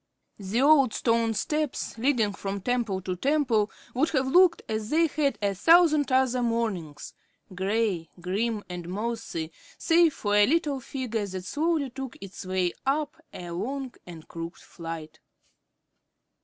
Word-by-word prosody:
The 205 +6 0
old 280 -5 +5
stone 230 -1 +1
steps 300 +6 -2
leading 230 -4 +1
from 195 0 -4
temple 230 -4 -1
to 185 -1 -2
temple 245 -3 +1 0.2
would 300 +6 +2
have 265 -3 +1
looked 350 +6 +4
as 215 -1 -3
they 330 +2 +4
had 285 -6 0
a 200 -1 +2
thousand 305 - +5
other 255 -1 +3
mornings, 215 -11 -2 0.4
gray, 190 -3 -1
grim, 205 +5 -1
and 175 -1 -7
mossy, 210 -5 -4 0.3
save 330 -2 +4
for 205 -1 -2
a 205 0 +6
little 295 -3 +1
figure 235 -5 -3
that 185 -1 -6
slowly 300 - 0
took 265 -1 -7
its 195 -1 -9
way 185 -2 0
up 290 +2 0 0.2
a 175 -1 -8
long 255 +9 -4
and 165 -3 -10
crooked 165 0 -7
flight. 165 -2 -8
230 Hz, 140 wpm, -27 LUFS, 190-275 Hz, 0.4 s, a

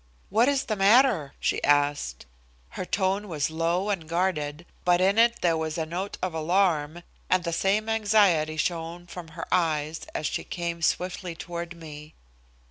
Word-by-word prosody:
"What 230 +6 +4
is 280 -1 +1
the 215 - -2
matter?" 205 - +4
she - - -1
asked. 145 - +1 0.4
Her - - -5
tone 195 +2 0
was 155 -4 -2
low 170 +5 0
and 165 -6 -4
guarded, 170 -3 -1 0.2
but 175 0 +4
in 195 +4 +3
it 235 0 +4
there 170 -2 +3
was 160 0 -3
a 160 - -1
note 180 +5 -4
of 185 -2 -1
alarm, 165 -1 +1 0.3
and 185 -1 +3
the 170 -1 -2
same 200 +5 +1
anxiety 205 -8 +3
shown 170 +1 -2
from 175 -1 -9
her - - -4
eyes 160 -3 0
as 155 - -2
she - - -2
came 170 -1 -4
swiftly 180 +1 -1
toward 170 0 -6
me. 155 -2 -11
175 Hz, 165 wpm, -26 LUFS, 160-195 Hz, 0.4 s, What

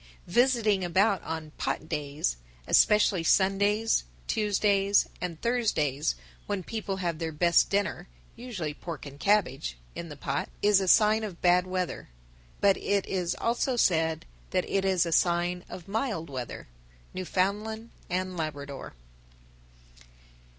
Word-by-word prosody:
_, - - -24 0.2
visiting 220 -2 +2
about 190 +4 +2
on 160 -1 -5
"pot 155 - -2
days," 145 - -2 0.3
especially 210 -4 +4
Sundays, 200 - +3 0.2
Tuesdays, 200 -1 +2
and 170 -3 -4
Thursdays, 160 - +1 0.3
when 200 -3 -2
people 210 -1 -4
have 170 -4 -2
their 165 -1 -2
best 170 +2 +3
dinner 200 +1 -1 0.3
(usually 195 -12 -5
pork 160 0 -7
and 140 0 -10
cabbage) 160 - +1 0.2
in 170 - -7
the 150 - -8
pot, 140 0 -2
is 205 -1 +5
a 190 - -2
sign 215 +3 +5
of 195 -6 -6
bad 180 +1 +3
weather. 185 - -3 0.5
But 200 -1 +4
it 200 -1 0
is 180 -3 -1
also 240 +2 0
said 160 -6 +2 0.2
that 185 -1 0
it 195 -1 0
is 185 -3 +3
a 170 - -3
sign 175 +1 +1
of 175 - -9
mild 200 - -2
weather. 125 -3 -6 0.5
_Newfoundland 205 +5 -2 0.2
and 185 +1 -2
Labrador. 145 - -5
185 Hz, 135 wpm, -28 LUFS, 160-205 Hz, 0.5 s, is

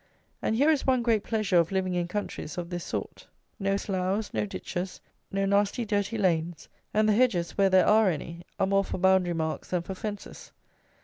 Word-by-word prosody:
And 220 - 0
here 285 +7 +4
is 295 -3 0
one 255 -2 +3
great 225 -3 +2
pleasure 215 -5 +1
of 170 +1 +3
living 190 -1 0
in 175 -1 -1
countries 180 -4 -5
of 175 0 -5
this 175 -1 -3
sort: - - -5 0.3
no 195 0 +1
sloughs, 195 +2 -2
no 210 - -1
ditches, 185 -1 -5 0.3
no 195 0 0
nasty 200 +4 +1
dirty 205 +1 -1
lanes, 170 -4 0 0.2
and 215 0 +2
the 215 - +4
hedges, 205 -7 +2
where 195 -1 +4
there 185 -1 +5
are 215 -1 +5
any, 170 +1 -5 0.2
are - - +3
more 195 +1 +2
for - - -4
boundary 185 -1 +3
marks 160 -1 -3
than 180 -2 -1
for 190 - -5
fences. 205 +1 -7
195 Hz, 195 wpm, -27 LUFS, 180-210 Hz, 0.3 s, there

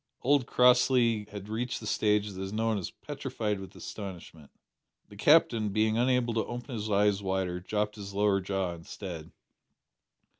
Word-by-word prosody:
Old 140 -1 +3
Crossley 125 -3 +4
had 100 -1 -9
reached 120 +3 -3
the 110 - -9
stage 105 -1 +1
that 95 0 -7
is 95 0 -4
known 110 0 0
as 90 - -5
petrified 130 -8 -4
with 95 - -10
astonishment. 85 -7 -8 0.6
The 105 - -13
Captain, 115 -4 +4
being 110 +2 +1
unable 125 0 +2
to 110 - 0
open 120 +2 -6
his 110 -1 -4
eyes 100 0 +2
wider, 95 -2 -1
dropped 105 +3 -2
his 100 -1 -7
lower 100 -1 +2
jaw 95 -2 -2
instead. 85 -1 -8
105 Hz, 155 wpm, -29 LUFS, 95-120 Hz, 0.6 s, Crossley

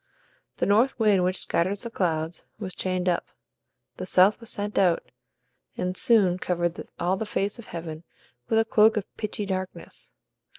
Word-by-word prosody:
The - - +1
north 225 +7 +3
wind, 210 -5 +3
which 185 +1 +1
scatters 190 +4 0
the 235 - -6
clouds, 165 -4 -2
was 190 -4 -6
chained 185 -1 -2
up; 175 -1 +1 0.7
the 185 - -5
south 185 +3 +5
was 230 - -7
sent 205 0 -1
out, 180 -4 +2 0.7
and 180 0 -2
soon 190 -5 +4
covered 175 -2 -2
all 180 +2 +1
the 220 - -3
face 200 +2 -1
of 235 - -11
heaven 165 -1 -7 0.5
with 225 - +2
a 225 - +4
cloak 220 0 +4
of 205 - -1
pitchy 210 -1 -4
darkness. 185 - -6
185 Hz, 165 wpm, -26 LUFS, 180-210 Hz, 0.7 s, south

